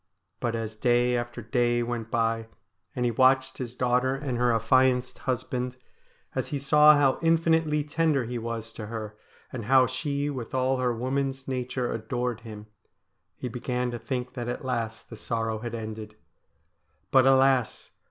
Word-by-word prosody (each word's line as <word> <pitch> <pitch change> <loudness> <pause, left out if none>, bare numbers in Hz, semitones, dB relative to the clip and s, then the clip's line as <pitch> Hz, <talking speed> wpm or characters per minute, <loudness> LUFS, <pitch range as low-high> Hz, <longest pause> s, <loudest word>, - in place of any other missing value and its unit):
But 115 -1 -1
as 110 -1 -4
day 120 +2 +2
after 120 0 -4
day 120 +1 +1
went 115 -1 -4
by, 115 -1 0 0.5
and 125 - 0
he 120 - +2
watched 130 +2 +3
his 125 -2 -5
daughter 125 +1 +1
and 135 -2 -3
her 125 0 +3
affianced 125 +2 +2
husband, 125 0 -2 0.6
as - - -2
he 145 - -2
saw 150 +2 +6
how 135 -2 +3
infinitely 165 -2 +2
tender 150 -3 +1
he 120 +1 -4
was 115 0 -5
to 105 - -7
her, 110 -1 -6 0.4
and 120 -4 -5
how 130 +1 +6
she 140 +3 -2
with 130 -4 -5
all 130 +1 +1
her 125 -1 +1
woman's 135 +3 -2
nature 125 -1 -2
adored 120 +1 -3
him, 110 -2 -10 0.7
he - - -5
began 125 +1 -2
to 120 - -5
think 125 -1 -4
that 120 -1 -5
at 125 - -5
last 115 -3 -3
the - - -6
sorrow 115 0 -2
had 120 0 -5
ended. 110 -1 -7 1.0
But 130 -1 +6
alas 135 -3 +3
125 Hz, 160 wpm, -27 LUFS, 115-130 Hz, 1.0 s, saw